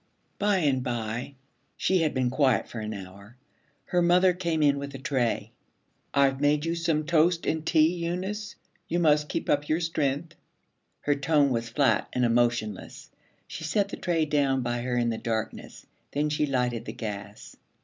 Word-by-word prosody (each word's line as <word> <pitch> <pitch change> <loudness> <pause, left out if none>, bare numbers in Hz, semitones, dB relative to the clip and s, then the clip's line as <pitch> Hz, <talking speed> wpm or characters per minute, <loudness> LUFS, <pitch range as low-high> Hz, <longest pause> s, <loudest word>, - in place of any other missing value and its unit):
By 205 -1 +2
and 140 -7 +1
by, 120 +2 -4 0.4
she 190 0 +2
had 155 -3 0
been 125 -1 +1
quiet 130 -3 +2
for 120 - -7
an 110 0 -4
hour, 100 +2 -10 0.5
her 180 - +1
mother 180 +1 +4
came 170 -3 -1
in 140 -1 +3
with 140 0 -6
a - - -4
tray. 130 -3 -1 0.6
'I've 135 -1 +3
made 145 +1 +2
you 165 - 0
some 165 -2 0
toast 170 +1 +2
and 160 0 -1
tea, 160 +1 +3
Eunice. 190 +5 -3 0.3
You 170 - -1
must 150 -3 +3
keep - - -3
up 145 0 +1
your 155 - +2
strength.' 160 -1 -1 0.7
Her 145 - +2
tone 145 0 +2
was 115 -1 -1
flat 140 +4 +2
and 125 -1 +2
emotionless. 120 -3 -1 0.3
She - - -8
set 200 +6 0
the - - -5
tray 165 -3 0
down 140 -3 +1
by 120 0 -2
her 125 0 -1
in 120 -1 +1
the 110 - -4
darkness. 110 -2 -4 0.3
Then 150 +1 0
she 150 0 +1
lighted 125 -4 -1
the - - -6
gas. 105 -2 -7
145 Hz, 175 wpm, -27 LUFS, 120-165 Hz, 0.7 s, mother